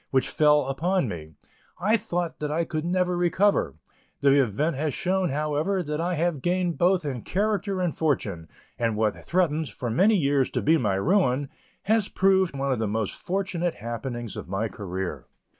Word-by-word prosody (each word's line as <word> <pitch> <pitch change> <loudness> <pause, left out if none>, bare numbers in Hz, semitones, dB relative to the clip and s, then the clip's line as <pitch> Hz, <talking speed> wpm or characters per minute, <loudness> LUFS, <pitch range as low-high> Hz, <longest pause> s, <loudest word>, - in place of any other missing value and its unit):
When 130 - +3
the - - -7
blow - - -6 0.3
fell - - -7
upon 175 +4 0
me, 80 -5 -7 0.4
I 210 +5 +3
thought 175 -6 -2
that 150 - -2
I 165 +3 0
could 155 0 -3
never 180 0 +1
recover; 175 - +2 0.5
the 140 -1 +5
event 135 +7 0
has 150 +2 -2
shown, 190 -3 0
however, 150 +6 0
that 150 0 -3
I 175 +1 0
have 165 -3 0
gained 175 +1 0
both 180 -1 +3
in 130 -5 -3
character 200 - -1
and 180 -3 -1
fortune, 100 - -1 0.3
and 115 -2 0
what 110 -1 0
threatened, 160 -4 0
for 120 -4 -4
years, 145 - +3
to - - -2
be 160 +3 +4
my 105 -5 +1
ruin, 140 - +2 0.3
has 215 0 +2
proved 190 -5 +2
one 135 0 -1
of 125 - 0
the 110 - 0
most 105 0 -2
fortunate 185 -2 -2
happenings 115 +1 -5
of - - -7
my 100 +4 -1
career. 95 -3 -5
155 Hz, 180 wpm, -26 LUFS, 125-180 Hz, 0.5 s, the